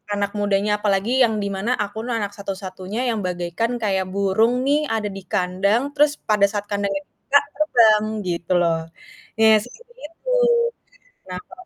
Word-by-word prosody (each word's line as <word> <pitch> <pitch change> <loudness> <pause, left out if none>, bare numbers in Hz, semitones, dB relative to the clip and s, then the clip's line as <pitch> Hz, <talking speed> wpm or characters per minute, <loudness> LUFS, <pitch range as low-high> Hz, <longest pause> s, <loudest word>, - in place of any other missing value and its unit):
Anak 200 0 -2
mudanya 205 0 +1
apalagi 210 +6 +2
yang 220 -2 0
di - - -2
mana 215 +6 -2
aku 205 +1 -6
tuh - - -4
anak 205 -2 -3
satu-satunya 195 +1 -6
yang 230 -2 0
bagaikan 175 +6 -2
kayak 190 -3 0
burung 200 +4 +2
nih 290 +2 +3
ada 215 -2 -1
di 195 - -8
kandang, 200 +3 +1
terus 295 0 +4 0.2
pada 210 -1 +2
saat 205 0 -3
kandangnya 200 -1 -1
dibuka 285 - +1 0.2
terbang 230 -8 +4 0.2
gitu 170 +1 -2
loh. 165 -1 +2 0.6
Iya 220 0 +7
seperti 475 - -16
itu. 330 +11 -8 1.0
Nah, 180 0 -5
kalau 370 0 -14
205 Hz, 160 wpm, -22 LUFS, 195-235 Hz, 1.0 s, Iya